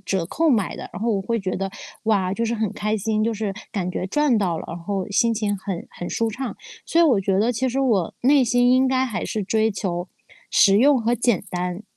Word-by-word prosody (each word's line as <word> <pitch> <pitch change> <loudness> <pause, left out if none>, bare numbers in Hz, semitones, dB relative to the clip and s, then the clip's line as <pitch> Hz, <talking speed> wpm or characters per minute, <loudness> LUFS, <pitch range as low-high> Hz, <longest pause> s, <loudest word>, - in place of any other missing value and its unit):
折 190 -4 -1
扣 325 - 0
买 215 - +1
的。 - - -7
然 - - -6
后 235 - +1
我 195 - 0
会 230 +4 -1
觉 190 -2 -3
得， 195 0 -3 0.3
哇， 195 -4 +1
就 230 +3 -1
是 230 +1 -1
很 220 -3 -1
开 215 +1 -1
心， 215 +1 -1
就 225 +1 0
是 210 -2 -3 0.2
感 185 -5 -2
觉 185 - -3
赚 280 +1 +2
到 175 -5 0
了， - - -7
然 170 - -6
后 195 +3 -3
心 230 +3 +3
情 205 -2 -1
很 190 -2 -5
很 175 - -7
舒 230 -1 -1
畅。 255 +3 -5 0.3
所 335 - +2
以 - - +6
我 245 -11 +4
觉 195 0 +1
得 230 +4 +2
其 260 +3 -1
实 255 +2 -2
我 220 -10 +1
内 275 +2 +5
心 245 +1 +3
应 260 +1 +4
该 260 0 +2
还 225 - -3
是 215 -3 -3
追 220 +3 +1
求 180 -2 -3 0.4
实 195 +1 +5
用 275 +1 +5
和 230 +1 +1
简 235 -5 +1
单。 180 +2 -3
215 Hz, 260 characters per minute, -22 LUFS, 195-240 Hz, 0.4 s, 以